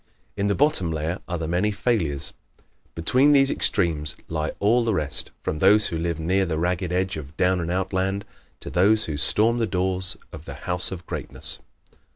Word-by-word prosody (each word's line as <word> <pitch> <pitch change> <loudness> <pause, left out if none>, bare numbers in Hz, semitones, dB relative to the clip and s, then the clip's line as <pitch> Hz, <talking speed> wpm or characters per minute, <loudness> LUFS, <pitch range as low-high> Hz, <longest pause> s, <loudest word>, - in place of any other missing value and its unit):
In 100 0 -1
the 100 - +1
bottom 140 - +1
layer 80 +4 -3
are 90 - -3
the 80 -1 -4
many 90 +5 0
failures. 85 - -1 0.6
Between 130 - +3
these 135 -1 +4
extremes 80 -8 +2
lie 80 -1 -2
all 115 +4 +3
the 110 -3 0
rest 75 -4 0
from 75 - -4
those 105 +4 +5
who - - -4
live 85 -1 -2
near 95 +4 +1
the 80 -2 -2
ragged 90 +2 -1
edge 95 -1 -1
of 75 0 -10
Down 90 0 +2
and 85 -1 -3
Out 95 +2 -2
Land 95 +2 -1 0.4
to - - -8
those 105 +5 +3
who 80 - -4
storm 110 +10 +2
the 115 - 0
doors 95 0 +1 0.2
of 80 0 -10
the 70 - -8
House 90 0 +2
of 90 -2 -7
Greatness. - - -1
90 Hz, 195 wpm, -23 LUFS, 80-100 Hz, 0.6 s, those